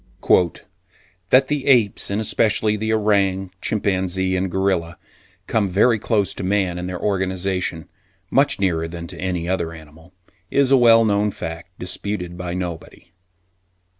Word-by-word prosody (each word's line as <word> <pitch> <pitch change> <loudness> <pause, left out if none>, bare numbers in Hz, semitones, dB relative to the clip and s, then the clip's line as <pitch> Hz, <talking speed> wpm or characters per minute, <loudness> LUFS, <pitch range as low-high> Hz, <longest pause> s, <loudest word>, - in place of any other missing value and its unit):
"That 130 +1 +5
the 145 -2 -2
apes, 120 -7 +3
and 100 +1 -1
especially 110 0 +1
the 110 +1 -2
orang, 100 -3 +1
chimpanzee 95 -2 0
and 95 +1 -1
gorilla, 90 -2 -1 0.5
come 105 -3 0
very 110 +5 +3
close 105 -2 0
to - - -7
man 95 -2 0
in 90 - -4
their 90 -1 -5
organisation, 95 -3 -2 0.4
much 140 -1 +3
nearer 85 -4 0
than 85 0 -7
to - - -10
any 90 -2 -2
other 85 -3 -2
animal, 80 +2 -15 0.4
is 140 -1 +2
a - - +7
well 115 -2 +6
known 105 0 +2
fact, 85 -1 -8
disputed 90 -1 -4
by 90 0 -5
nobody. 85 -1 -7
95 Hz, 140 wpm, -21 LUFS, 90-105 Hz, 0.5 s, a